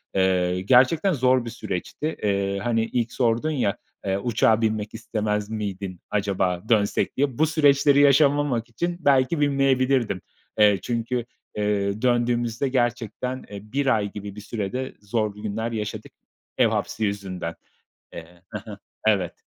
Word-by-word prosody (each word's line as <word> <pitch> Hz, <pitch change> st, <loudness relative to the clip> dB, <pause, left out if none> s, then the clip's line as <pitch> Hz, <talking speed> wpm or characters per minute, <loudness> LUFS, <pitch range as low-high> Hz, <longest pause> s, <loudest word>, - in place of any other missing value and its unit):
Eee, 90 Hz, -1 st, +2 dB
gerçekten 130 Hz, -, +4 dB
zor 130 Hz, -3 st, +2 dB
bir -, -, -4 dB
süreçti. 115 Hz, -, -4 dB
Eee, 100 Hz, -1 st, 0 dB
hani 115 Hz, -2 st, +1 dB
ilk 120 Hz, 0 st, -2 dB
sordun 120 Hz, +5 st, +1 dB
ya: 115 Hz, -9 st, 0 dB, 0.3 s
Eee, 95 Hz, 0 st, 0 dB
"Uçağa 110 Hz, +1 st, +2 dB
binmek 110 Hz, -1 st, -1 dB
istemez 105 Hz, -1 st, -2 dB
miydin?" 100 Hz, -4 st, -4 dB
acaba 95 Hz, -3 st, 0 dB
dönsek 105 Hz, 0 st, +1 dB
diye. 135 Hz, -3 st, 0 dB
Bu 155 Hz, -, +4 dB
süreçleri 145 Hz, -2 st, +4 dB
yaşamamak 140 Hz, -4 st, +3 dB
için 170 Hz, +9 st, -3 dB
belki 140 Hz, +1 st, +3 dB
binmeyebilirdim. 135 Hz, -7 st, +2 dB, 0.4 s
Eee, 105 Hz, -3 st, +5 dB
çünkü, 120 Hz, 0 st, -2 dB, 0.3 s
eee, 105 Hz, 0 st, 0 dB
döndüğümüzde 120 Hz, 0 st, +1 dB
gerçekten, 120 Hz, 0 st, -1 dB
eee, 100 Hz, -1 st, -7 dB
1 140 Hz, 0 st, 0 dB
ay 105 Hz, -2 st, -2 dB
gibi 100 Hz, -1 st, -7 dB
bir 105 Hz, -, -8 dB
sürede 115 Hz, +5 st, -4 dB
zorlu 105 Hz, -1 st, -2 dB
günler 110 Hz, +2 st, -3 dB
yaşadık 105 Hz, -2 st, -5 dB, 0.5 s
ev -, -, +5 dB
hapsi 110 Hz, -, -2 dB
yüzünden. 95 Hz, -4 st, -4 dB, 0.6 s
Eee 85 Hz, +2 st, -11 dB
Hı 105 Hz, -, -5 dB
hı. 100 Hz, -, -8 dB, 0.3 s
Evet. 95 Hz, -5 st, +1 dB
115 Hz, 140 wpm, -24 LUFS, 100-130 Hz, 0.6 s, Eee